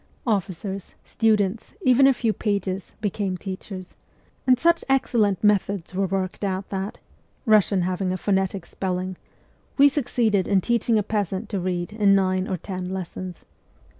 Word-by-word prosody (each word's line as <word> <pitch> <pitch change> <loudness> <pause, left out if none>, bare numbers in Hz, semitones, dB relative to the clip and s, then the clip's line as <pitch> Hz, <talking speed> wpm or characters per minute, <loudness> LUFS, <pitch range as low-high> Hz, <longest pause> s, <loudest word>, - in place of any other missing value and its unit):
Officers, 195 -2 -2
students, 215 -2 +1
even 260 0 +6
a - - +7
few 225 -3 0
pages, 200 -3 -2
became 200 -2 -1
teachers; 190 0 -7 0.5
and 255 -1 +6
such 335 +5 +3
excellent 230 -8 +2
methods 200 -3 +1
were 195 +1 0
worked 190 +1 -2
out 190 -1 -2
that 195 +1 -4 0.5
(Eussian 205 -3 +4
having 185 +1 -1
a 185 - -1
phonetic 190 -1 0
spelling) 185 0 -3 0.6
we 285 0 +8
succeeded 235 -8 +1
in 200 -1 +4
teaching 235 +2 +1
a 210 - +2
peasant 205 0 -2
to 200 - -2
read 180 +2 -2
in 205 -2 +4
nine 185 0 +1
or 185 - -2
ten 185 +1 -5
lessons. 185 -1 -6
195 Hz, 145 wpm, -24 LUFS, 185-215 Hz, 0.6 s, we